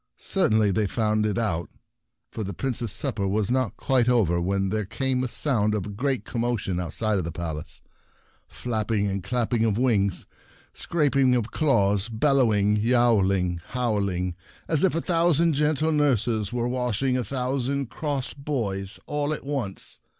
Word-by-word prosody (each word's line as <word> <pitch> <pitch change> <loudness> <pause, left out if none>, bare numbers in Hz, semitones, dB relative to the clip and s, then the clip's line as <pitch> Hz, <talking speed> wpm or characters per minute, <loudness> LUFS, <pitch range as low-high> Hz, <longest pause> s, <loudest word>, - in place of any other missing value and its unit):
Certainly 110 -2 +2
they 105 +2 +1
found 110 0 0
it 105 - -1
out, 90 -9 -1 0.6
for 110 - -4
the 100 -2 -5
Prince's 120 -3 -2
supper 110 -3 -1
was 105 +2 0
not 130 -4 0
quite 125 -2 +2
over 90 -9 +2
when 95 +2 0
there 110 +2 -1
came 130 +5 -1
the 130 - -1
sound 115 -5 +1
of 100 - -2
a - - -6
great 130 +6 -2
commotion 115 -6 -2
outside 100 +5 -1
of - - -2
the 85 - -4
Palace— 80 -2 -5 0.7
flapping 110 -3 -2
and 100 -2 -2
clapping 120 +2 0
of 110 -2 +1
wings, 105 -7 +1 0.5
scrap 150 -5 0
ing 130 -2 +4
of 120 -2 -1
claws, 105 -8 +2
bellowing, 110 -4 +2
yowl 115 -3 +3
ing, 90 -3 -1
howling, 100 -7 -1 0.3
as 160 0 +2
if 190 - +3
a 165 - 0
thousand 170 -1 +2
gentle 150 +2 +1
nurses 120 -8 +1
were 120 0 -1
washing 125 +1 0
a 125 - 0
thousand 130 +2 -2
cross 140 -4 -3
boys 110 -9 -3
all 145 0 -2
at 150 - -4
once. 135 -9 -2
115 Hz, 160 wpm, -25 LUFS, 100-130 Hz, 0.7 s, ing